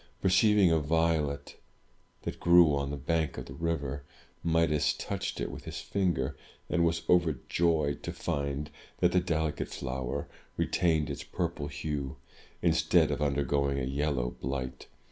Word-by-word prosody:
Perceiving 100 -1 +5
a 80 - +4
violet 80 -2 0 0.7
that - - -5
grew 85 -3 +6
on 70 0 -1
the 70 - -3
bank 80 +3 -1
of 65 - -5
the 65 - -9
river, 70 -2 -2 0.4
Midas 75 -3 +2
touched - - -4
it - - -2
with - - -9
his - - -5
finger, 95 -3 0 0.4
and 90 -1 +3
was 85 0 +1
overjoyed 80 -2 +2
to - - -4
find 70 +1 -3 0.3
that - - +3
the 90 - +4
delicate 80 -3 -1
flower 65 +1 -4 0.3
retained 80 -4 +1
its - - -5
purple 85 -4 -3
hue, 75 -2 -4 0.5
instead 80 -4 +4
of 70 - -2
undergoing 70 -1 +1
a 65 - -1
yellow 70 -2 -1
blight. 65 0 -5
75 Hz, 145 wpm, -30 LUFS, 70-85 Hz, 0.7 s, grew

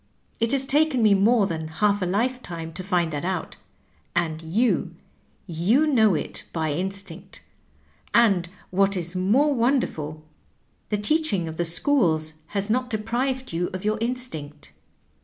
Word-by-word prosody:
It 230 +1 +1
has 270 -1 +1
taken 290 -3 +2
me 210 -2 +6
more 210 +2 +4
than 160 -4 -3
half 205 +5 +1
a 180 - 0
lifetime 185 -6 -2
to 185 - -6
find 175 -4 0
that 145 - -3
out, 185 -1 -3 0.6
and 165 -2 0
you 205 +10 0 0.3
— - - -39
^you 200 - +2
know 220 - +4
it - - -3
by 160 -2 -1
instinct; 190 +1 -5 0.7
and 195 -7 +3 0.2
what 195 +1 +2
is 175 0 -4
more 240 +11 +3
wonderful, 230 - -1 0.7
the 210 - 0
teaching 210 - +1
of 160 0 -7
the 175 - 0
schools 165 - +2
has 200 +2 -2
not 250 +3 0
deprived 245 +3 -2
you 175 +2 -1
of 185 - -6
your 215 +1 0
instinct. 230 - -4
195 Hz, 150 wpm, -24 LUFS, 170-240 Hz, 0.7 s, me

